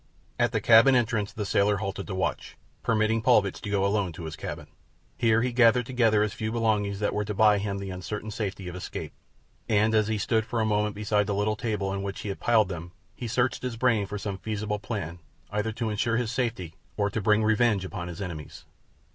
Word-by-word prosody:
At - - +3
the - - 0
cabin 120 +4 +7
entrance 110 -4 +1
the 110 -2 -4
sailor 100 +1 +2
halted 100 -1 -4
to 95 - -4
watch, 95 - -3 0.2
permitting 110 0 +1
Paulvitch 105 -5 +3
to 100 - -5
go 100 -1 +1
alone 100 -2 +1
to 85 - -8
his 80 0 -5
cabin. - - -6 0.5
Here 115 -1 +3
he 125 -1 -1
gathered 120 0 +5
together 115 -4 +3
his 105 -2 -2
few 110 +2 -3
belongings 105 -3 0
that 105 - 0
were 105 - 0
to 105 0 -4
buy 105 0 +5
him 100 0 -2
the 100 -1 -5
uncertain 105 +4 -5
safety 100 -3 -4
of 90 - -6
escape, 90 - -6 0.6
and 110 +1 +3
as 110 -1 +3
he 110 0 0
stood 110 +3 +1
for 115 +1 -3
a 110 - +2
moment 105 -1 0
beside 105 -1 +1
the 100 - -1
little 105 +1 +1
table 105 -3 -2
on 95 0 -2
which 100 0 -5
he 105 - -5
had 100 - -4
piled 110 -4 +3
them 85 -1 -7 0.2
he 120 - -6
searched 120 +2 0
his 125 -2 -4
brain 115 -5 +2
for 105 - -4
some 100 -1 -4
feasible 105 0 -3
plan 95 -5 -5 0.3
either 105 +2 -1
to 115 -1 -2
ensure 110 +2 0
his 120 -3 -1
safety 115 -10 -2 0.2
or 100 -1 +1
to 110 - -2
bring 105 +2 +3
revenge 110 -2 +2
upon 85 -2 -5
his 90 +3 -6
enemies. 80 -5 -8
105 Hz, 220 wpm, -27 LUFS, 100-110 Hz, 0.6 s, cabin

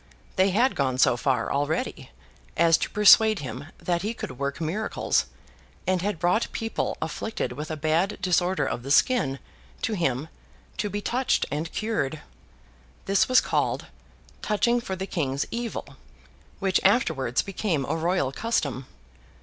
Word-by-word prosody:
They 190 +1 +4
had 235 +8 +3
gone 130 -2 0
so 130 - +4
far, 125 +2 0
already, 145 +3 -2 0.5
as 165 0 +5
to - - -2
persuade 215 +1 +6
him 130 - -6
that 175 -1 -1
he 215 +4 -3
could 130 - -7
work 140 +2 -2
miracles; 175 - 0 0.6
and 185 -1 +1
had 205 -1 -1
brought 175 +7 +1
people 225 -1 -2
afflicted 190 - -3
with 150 +5 -6
a 155 - -3
bad 160 +7 +1
disorder 180 0 +1
of - - -3
the 135 - -8
skin, 145 - +3 0.5
to 225 - 0
him, 150 -6 -1 0.5
to 205 +1 -1
be 205 +1 -3
touched 255 +5 +1
and 155 +3 -3
cured. 155 -10 -2 0.8
This 195 +4 +2
was 255 - +6
called - - -1 0.6
'touching 235 +3 +1
for 190 -5 -4
the 190 +1 -4
King's 140 -7 -1
Evil,' 235 0 -5 0.6
which 190 -1 +1
afterwards 160 - +2
became 190 -7 -1
a - - -1
royal 165 -3 0
custom. 140 - -2
175 Hz, 150 wpm, -26 LUFS, 140-210 Hz, 0.8 s, persuade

